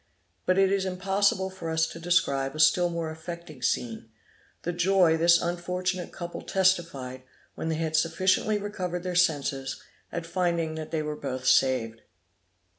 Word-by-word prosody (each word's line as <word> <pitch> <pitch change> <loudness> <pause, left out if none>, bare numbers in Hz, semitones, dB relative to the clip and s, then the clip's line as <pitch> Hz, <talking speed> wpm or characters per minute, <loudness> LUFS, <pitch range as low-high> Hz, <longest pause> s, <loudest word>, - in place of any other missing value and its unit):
But 185 - +3
it 195 0 +4
is 195 -1 +1
impossible 190 +1 +1
for 185 -3 -6
us 160 0 +2
to 165 - -8
describe 155 -5 +1
a - - -6
still 175 +2 +5
more 165 -2 -3
affecting 160 -3 -9
scene, 115 -2 -2 0.5
the 175 - -2
joy 175 -1 +4
this 170 +1 +5
unfortunate 180 +1 -2
couple 175 -1 -6
testified, 170 -9 0 0.3
when 160 - -4
they 160 - 0
had 160 0 -2
sufficiently 185 +6 +2
recovered 185 -4 -4
their 180 -1 -3
senses, 145 -6 +1 0.3
at 170 -1 -4
finding 170 -2 0
that 155 -1 -6
they 155 -1 -1
were 150 0 -3
both 130 -3 -5
saved. 115 -4 +2
170 Hz, 155 wpm, -27 LUFS, 155-185 Hz, 0.5 s, still